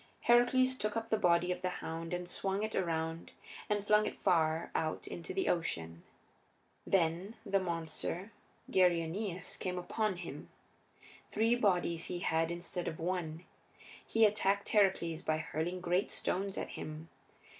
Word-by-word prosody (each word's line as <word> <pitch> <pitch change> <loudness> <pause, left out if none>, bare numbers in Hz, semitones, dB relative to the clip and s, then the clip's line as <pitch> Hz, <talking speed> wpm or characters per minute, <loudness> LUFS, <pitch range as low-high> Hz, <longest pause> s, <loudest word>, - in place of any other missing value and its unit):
Heracles 255 +2 +4
took 210 0 -1
up 225 0 -4
the 220 - +3
body 175 0 +3
of 180 - -3
the 185 - 0
hound, 165 -2 -5
and 180 0 -3
swung 195 +3 -1
it 220 - -2
around 165 -2 -2 0.4
and 205 -1 0
flung 210 0 +4
it - - -5
far 160 -1 +2
out 155 -1 -1
into 170 - -6
the 380 -1 -1
Ocean. 85 - -1 0.9
Then 180 +3 +1
the 195 - +2
monster 170 +3 -3 0.4
Geryoneus 180 +1 +1
came 180 -1 -3
upon 210 +3 -1
him. 175 -1 -7 0.8
Three 225 +2 +2
bodies 180 -7 +2
he 180 - -3
had 165 -1 +1
instead 175 +1 -3
of 160 - -4
one; 170 -1 -2 0.6
he 225 0 +4
attacked 200 -1 +2
Heracles 190 -6 +2
by 155 - 0
hurling 160 +3 -3
great 180 +3 +1
stones 195 +1 -2
at - - -3
him. 155 +2 -7
180 Hz, 145 wpm, -34 LUFS, 165-200 Hz, 0.9 s, Heracles